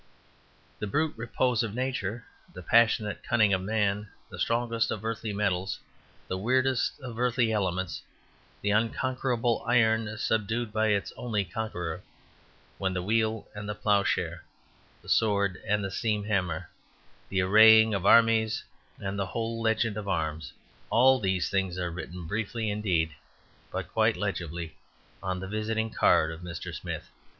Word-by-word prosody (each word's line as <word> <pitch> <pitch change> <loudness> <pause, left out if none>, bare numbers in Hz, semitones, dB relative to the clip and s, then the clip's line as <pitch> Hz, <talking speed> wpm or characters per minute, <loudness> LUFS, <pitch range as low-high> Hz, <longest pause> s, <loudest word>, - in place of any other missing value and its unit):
The 105 - -3
brute 155 +8 0
repose 120 +1 0
of 110 -2 -3
Nature, 125 -4 -2 0.3
the 90 - -10
passionate 110 0 +3
cunning 110 -4 +3
of 95 - +1
man, 105 0 0 0.2
the - - -8
strongest 115 -1 0
of 110 0 -4
earthly 115 -1 -3
metals, 100 -2 -1 0.5
the 95 - -3
wierdest 130 +4 +1
of 120 -3 -7
earthly 120 -2 +2
elements, 95 -4 -1 0.6
the 100 - +1
unconquerable 120 +2 0
iron 110 -2 +2
subdued 110 +1 -1
by 110 0 +2
its 100 -2 0
only 105 -5 -1
conqueror, 90 -3 -4 0.8
the 95 -2 -1
wheel 110 +1 0
and 105 0 -6
the 105 - -3
ploughshare, 100 -2 0 0.6
the - - -17
sword 100 -4 +2
and 105 0 +1
the 95 - -3
steam 105 +1 -1
hammer, 90 -5 -1 0.6
the 95 -1 +1
arraying 110 +3 +7
of 100 -3 -1
armies 115 +1 +4 0.3
and 100 -1 -4
the 95 - -1
whole 115 +3 -3
legend 110 -1 +1
of 105 -1 -5
arms, 80 -4 -2 0.4
all 130 +2 +5
these 95 -4 0
things 95 -2 -1
are 90 -1 -2
written, 85 +1 -7
briefly 110 +3 -2
indeed, 90 -7 0 0.6
but - - -5
quite - - +3
legibly, 85 -1 -4 0.5
on 95 -1 -2
the 95 - -6
visiting 110 +2 -2
card 80 -5 +3
of 80 +1 -8
Mr. 85 -2 -6
Smith. - - -6
105 Hz, 145 wpm, -28 LUFS, 95-115 Hz, 0.8 s, arraying